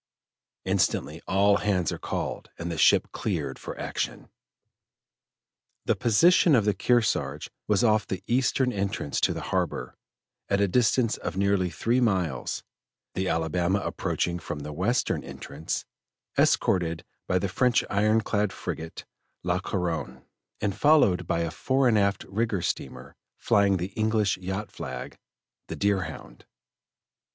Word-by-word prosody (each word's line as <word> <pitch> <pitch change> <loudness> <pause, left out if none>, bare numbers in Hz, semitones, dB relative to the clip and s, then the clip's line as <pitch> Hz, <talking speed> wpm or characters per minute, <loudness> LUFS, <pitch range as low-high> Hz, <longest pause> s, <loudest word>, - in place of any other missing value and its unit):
Instantly 80 +4 0
all 100 +1 +4
hands 95 -5 0
are - - -5
called - - -4
and 85 +1 -4
the 80 - -4
ship - - +4
cleared - - -3
for - - -7
action. - - -4 1.6
The - - +2
position 165 - +5
of 110 -5 +3
the 105 - +3
Kearsarge 115 +3 0 0.2
was 105 0 +2
off 110 -2 +3
the 95 0 -4
eastern 125 +1 +1
entrance 100 -7 -2
to - - +3
the - - -4
harbor, 60 - -1 0.5
at 100 - +2
a 100 - +3
distance 115 +3 +2
of - - -5
nearly 100 -2 +2
three 120 +8 0
miles, 90 - 0 0.5
the 95 0 -1
Alabama 85 +4 +1
approaching 85 -2 -2
from 75 -2 -6
the 75 +1 -6
western - - 0
entrance, 75 +3 -5 0.5
escorted 85 -3 +2 0.2
by 90 - +2
the 100 - 0
French 120 +6 +2
iron 110 +2 +2
clad 105 -2 0
frigate 80 0 -6 0.4
La 90 +1 +1
Couronne, 85 -9 -3 0.4
and 100 -2 -1
followed 100 - +4
by 85 - 0
a 85 -1 -2
fore 130 +8 +1
and 110 -3 +4
aft 100 -1 +1
rigged 100 -2 -1
steamer, - - -4 0.2
flying 100 -2 +3
the 90 +2 -3
English 110 -2 +1
yacht 95 +3 -4
flag, 65 -1 -7 0.5
the - - -5
Deerhound. 90 -11 -2
100 Hz, 140 wpm, -27 LUFS, 85-110 Hz, 1.6 s, position